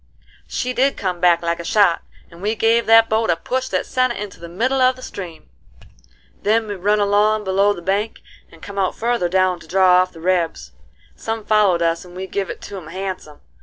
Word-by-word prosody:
She 250 0 -3
did 270 +2 +1
come 185 -3 -3
back 170 -1 +3
like 170 0 -1
a - - -5
shot, 200 -3 +3 0.3
and 170 +1 -14
we 210 +3 -1
give 225 +2 +2
that 225 0 +7
boat 220 -1 0
a 170 - +4
push 255 +9 -3
that - - -1
sent 255 -1 0
it - - -8
into 205 -2 -7
the 170 - -9
middle 255 +9 0
of 255 0 +4
the 255 - -13
stream. 175 -5 -8 0.9
Then 220 +1 +1
we 205 - -3
run 205 +2 +1
along 210 +1 +2
below 195 +1 +2
the 175 -4 -6
bank, 200 +4 -2 0.3
and 165 - -18
come 200 0 -6
out 190 - 0
further 235 -6 0
down 185 0 +1
to - - -15
draw 185 0 +5
off 185 0 -2
the 165 - -14
rebs. 165 - -1 0.4
Some 225 -1 -5
followed 200 -5 +3
us 165 0 0
and 180 -1 -14
we 190 +1 -5
give 195 -1 -3
it - - -7
to 200 - -8
'em 170 -5 -9
handsome. 185 -4 -6
195 Hz, 220 wpm, -20 LUFS, 175-220 Hz, 0.9 s, that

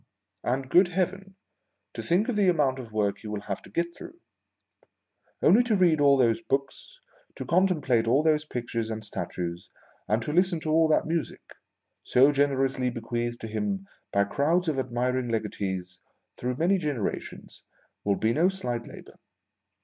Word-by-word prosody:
A 125 +2 +1
nd, 135 -1 -9
good 180 +1 +6
Heaven, 190 +2 -3 0.6
to - - -5
think 185 +6 +1
of 250 - -1
the 200 -3 +3
amount 140 -6 +1
of 115 -3 -9
work 100 -2 0
he 110 - -10
will 105 -1 -4
have 100 -1 -5
to - - -15
get 170 0 -2
through! 345 0 -11 1.2
Only 220 +6 +6
to 225 -3 +2
read 170 -6 +3
all 140 -1 +6
those 125 +4 +2
books, 140 - -4 0.4
to - - -6
contemplate 155 -11 +2
all 135 +6 +3
those 155 -1 +2
pictures 120 -5 -4
and 110 -1 -5
statues, 90 -2 -5 0.4
and 110 - +2
to 150 - -3
listen 180 0 +2
to 155 - -2
all 160 +1 +4
that 155 - +2
music, 165 0 -4 0.5
so 135 +3 +4
generously 135 -2 +1
bequeathed 120 0 -3
to 115 - -5
him 195 - -3 0.3
by 100 - +3
crowds 155 - +1
of 150 -4 0
admiring 125 0 -1
legatees 95 -5 -3 0.4
through 125 +1 -3
many 185 +5 +2
generations, 145 - -4 0.4
will 100 -1 +1
be 110 +3 +1
no 170 +7 +3
slight 125 -11 -4
labor. - - -13
135 Hz, 165 wpm, -27 LUFS, 115-170 Hz, 1.2 s, good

